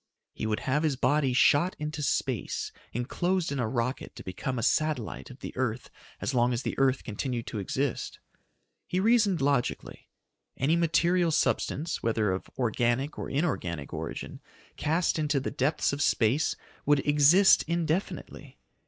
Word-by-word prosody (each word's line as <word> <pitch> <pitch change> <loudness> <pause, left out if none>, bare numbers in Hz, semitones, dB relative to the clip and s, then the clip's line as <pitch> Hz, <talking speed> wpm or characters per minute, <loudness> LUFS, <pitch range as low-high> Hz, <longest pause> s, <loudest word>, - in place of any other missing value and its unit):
He - - -3
would 105 -1 -1
have 140 +3 0
his 155 -4 +1
body 140 +1 +2
shot 145 +7 +4
into 150 0 -4
space 130 -4 -1 0.2
enclosed 175 +8 -1
in 140 - -2
a 120 - 0
rocket 125 +3 -3
to - - -9
become 125 +8 -4
a 115 - -2
satellite 155 -6 0
of 130 +1 -13
the - - -7
earth 125 -2 -2 0.3
as - - -2
long 120 0 +3
as 120 +2 -2
the - - -2
earth 135 -1 +2
continued 120 +2 -3
to 110 - -5
exist. 130 +7 -2 0.7
He 180 - -1
reasoned 210 - +3
logically. 140 -3 -1 0.5
Any 145 +5 +2
material 170 +1 +2
substance, 155 0 0
whether 110 -3 +1
of 95 - -4
organic 120 +3 0
or - - -4
inorganic 90 - -2
origin, - - -6 0.3
cast 160 +2 0
into 150 -2 +1
the 135 - -4
depths 140 +2 0
of 140 - -3
space 125 +4 +2 0.3
would 145 -1 +2
exist 150 +7 +6
indefinitely. 170 +2 -3
140 Hz, 155 wpm, -28 LUFS, 120-155 Hz, 0.7 s, exist